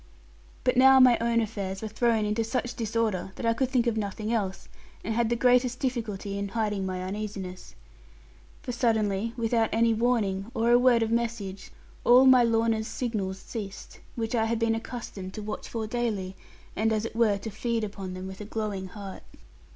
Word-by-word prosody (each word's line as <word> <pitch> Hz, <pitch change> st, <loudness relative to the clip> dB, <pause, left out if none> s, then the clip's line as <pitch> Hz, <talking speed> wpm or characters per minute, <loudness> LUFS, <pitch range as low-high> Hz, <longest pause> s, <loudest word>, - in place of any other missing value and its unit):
But 250 Hz, 0 st, +2 dB
now 265 Hz, +1 st, +8 dB
my 255 Hz, -2 st, +7 dB
own 230 Hz, 0 st, +2 dB
affairs 200 Hz, -3 st, -4 dB
were -, -, -2 dB
thrown 220 Hz, 0 st, +1 dB
into 210 Hz, +2 st, 0 dB
such 245 Hz, +1 st, -2 dB
disorder 220 Hz, -4 st, -1 dB
that -, -, -5 dB
I 230 Hz, -, +3 dB
could 255 Hz, +2 st, 0 dB
think 250 Hz, -3 st, +2 dB
of 235 Hz, -2 st, 0 dB
nothing 215 Hz, +2 st, -2 dB
else, 195 Hz, -4 st, -2 dB, 0.4 s
and 225 Hz, -, -2 dB
had 230 Hz, 0 st, +1 dB
the 240 Hz, -, +1 dB
greatest 250 Hz, +1 st, +3 dB
difficulty 210 Hz, -6 st, -3 dB
in 200 Hz, -, -2 dB
hiding 210 Hz, -2 st, -1 dB
my 185 Hz, -1 st, -3 dB
uneasiness. 195 Hz, -2 st, -6 dB, 0.9 s
For -, -, -4 dB
suddenly, 225 Hz, -2 st, 0 dB
without 225 Hz, -1 st, +1 dB
any 230 Hz, 0 st, +3 dB
warning, 220 Hz, -4 st, 0 dB
or 230 Hz, +1 st, +2 dB
a 240 Hz, -, +7 dB
word 245 Hz, -2 st, +4 dB
of 225 Hz, -, -2 dB
message, 225 Hz, -5 st, -2 dB, 0.3 s
all 250 Hz, +2 st, +7 dB
my 260 Hz, -1 st, +7 dB
Lorna's 225 Hz, -1 st, +2 dB
signals 205 Hz, -6 st, -3 dB
ceased, 200 Hz, 0 st, -8 dB, 0.2 s
which 225 Hz, 0 st, -3 dB
I 225 Hz, -2 st, +2 dB
had 230 Hz, +1 st, 0 dB
been 230 Hz, 0 st, +1 dB
accustomed 225 Hz, -5 st, -6 dB
to 215 Hz, -, -5 dB
watch 215 Hz, +1 st, -5 dB
for 225 Hz, -2 st, -3 dB
daily, 215 Hz, -5 st, -2 dB, 0.4 s
and 220 Hz, +1 st, +1 dB
as 220 Hz, 0 st, 0 dB
it 230 Hz, -, -6 dB
were 225 Hz, -3 st, +3 dB
to 220 Hz, +2 st, -6 dB
feed 230 Hz, +2 st, -2 dB
upon 195 Hz, -3 st, -5 dB
them, 185 Hz, 0 st, -6 dB
with 190 Hz, +1 st, -8 dB
a -, -, -6 dB
glowing 210 Hz, -3 st, -3 dB
heart. 195 Hz, 0 st, -9 dB
225 Hz, 190 wpm, -27 LUFS, 200-235 Hz, 0.9 s, now